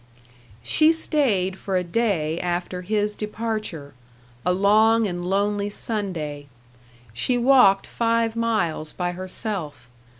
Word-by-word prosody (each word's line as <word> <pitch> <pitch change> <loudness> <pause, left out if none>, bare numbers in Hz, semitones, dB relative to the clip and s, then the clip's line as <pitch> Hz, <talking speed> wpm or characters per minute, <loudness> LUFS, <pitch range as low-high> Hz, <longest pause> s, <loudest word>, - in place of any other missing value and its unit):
She 310 - +4
stayed 230 - 0
for 190 -2 -1
a 180 - 0
day 170 -5 0
after 180 +1 -3
his 210 +2 0
departure, 210 -9 -4 0.5
a 180 - +2
long 215 +4 +4
and 175 -3 -3
lonely 205 +1 0
Sunday. 170 -10 -4 0.7
She 245 - +1
walked 240 -6 +5
five 230 -1 0
miles 210 -9 -1
by 175 -1 -2
herself. 180 - -5
200 Hz, 110 wpm, -23 LUFS, 175-225 Hz, 0.7 s, walked